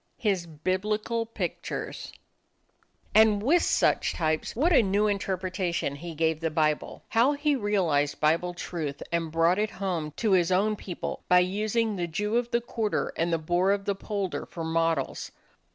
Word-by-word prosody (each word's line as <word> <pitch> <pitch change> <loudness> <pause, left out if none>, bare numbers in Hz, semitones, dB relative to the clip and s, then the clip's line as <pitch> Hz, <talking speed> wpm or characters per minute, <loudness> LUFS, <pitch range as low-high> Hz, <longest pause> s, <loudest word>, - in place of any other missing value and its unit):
His 195 -6 0
Biblical 210 +8 -1
Pictures 230 - -5 1.0
And 215 -1 +5
with 330 +8 +4
such - - +2
types 155 -1 -1
what 320 +9 +3
a 285 - +7
new 200 0 +1
interpretation 185 -6 -1
he 165 +3 -8
gave 160 0 +1
the 165 0 -1
Bible! 155 -1 -1
How 240 +6 +3
he 290 0 +1
realized 175 - +1
Bible 165 +3 +1
truth 155 -5 -5
and 165 -2 -1
brought 165 +4 +3
it 215 0 +1
home 185 -7 -3
to 220 -3 +1
his 180 -1 +3
own 205 +4 +2
people 185 -3 -6
by 180 0 +7
using 215 +4 0
the 175 -1 -1
Jew 210 +7 -2
of 240 0 -1
the 240 0 +1
quarter 225 -3 -2
and 170 +1 0
the 165 - +2
boor 175 +4 +1
of 200 0 +1
the 200 - +1
polder 195 -1 -4
for 165 - -6
models! 165 0 -1
185 Hz, 165 wpm, -27 LUFS, 165-215 Hz, 1.0 s, a